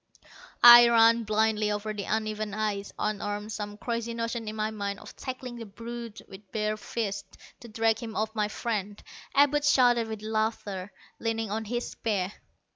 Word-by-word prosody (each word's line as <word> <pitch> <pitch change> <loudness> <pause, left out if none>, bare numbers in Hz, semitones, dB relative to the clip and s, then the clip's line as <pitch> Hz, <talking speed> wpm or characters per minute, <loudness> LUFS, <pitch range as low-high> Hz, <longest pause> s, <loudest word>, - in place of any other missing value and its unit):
I 240 0 +11
ran 230 0 +5
blindly 215 0 +1
over 210 +1 -3
the 205 -2 -5
uneven 215 -1 -2
ice, 210 -2 -2
unarmed, 205 0 -3
some 205 -1 -5
crazy 235 0 -3
notion 230 -1 -3
in 215 - -4
my 215 0 -1
mind 200 -2 -4
of - - -12
tackling 255 -2 -6
the 230 -2 -8
brute 230 +2 -8
with 195 +1 -14
bare 215 -1 -1
fists, 210 -1 -5 0.2
to 235 - -11
drag 225 0 +1
him 225 -2 -7
off 220 0 -1
my 210 -2 0
friend. 210 -2 -3 0.4
Abud 290 +1 +4
shouted 245 -5 +4
with 220 -1 -6
laughter, 215 -3 -2 0.3
leaning 225 -2 -2
on 220 +1 -2
his 240 +3 -3
spear. 200 -3 -2
220 Hz, 165 wpm, -28 LUFS, 210-230 Hz, 0.4 s, I